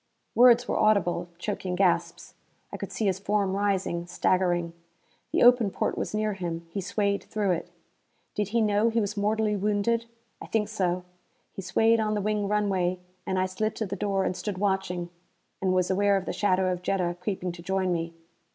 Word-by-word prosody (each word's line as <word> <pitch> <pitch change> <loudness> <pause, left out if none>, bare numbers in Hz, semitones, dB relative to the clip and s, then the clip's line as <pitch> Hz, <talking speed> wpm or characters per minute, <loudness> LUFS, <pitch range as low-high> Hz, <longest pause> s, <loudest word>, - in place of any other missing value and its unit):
Words 245 0 +6
were - - 0
audible; 175 -4 +2
choking 185 -1 -3
gasps. 175 -2 0 0.4
I - - -3
could - - -6
see 220 - -2
his 190 -1 +1
form 200 -1 0
rising, 190 -4 -1
staggering. 175 -1 +1 0.6
The - - +3
open 245 -3 +6
porte - - -1
was - - -3
near 215 0 0
him; 170 -3 -4
he 200 - -3
swayed 200 +1 -1
through 210 -3 0
it. 170 - -2 0.6
Did 210 -2 -1
he 230 +3 +1
know 210 +1 +3
he 230 0 +1
was 210 0 -2
mortally 210 +1 +1
wounded? 210 +3 0 0.3
I - - -8
think 210 -2 0
so. 180 -4 -1 0.5
He - - -6
swayed 225 +5 +3
on 215 -1 0
the - - 0
wing 210 0 0
runway, 195 -3 +1 0.3
and 190 - 0
I 185 - +2
slid 215 +4 -2
to 220 - -2
the 195 0 -4
door 195 -1 0
and 185 - -1
stood 205 -1 -4
watching. 185 -3 -1 0.5
And 190 -1 +1
was 185 0 +2
aware 200 +1 +3
of 190 - -4
the - - -3
shadow 185 -2 +2
of 180 -1 -3
Jetta 180 -2 -1
creeping 185 -1 -2
to 170 0 -10
join 190 0 0
me. 165 0 -3
195 Hz, 190 wpm, -27 LUFS, 180-210 Hz, 0.6 s, Words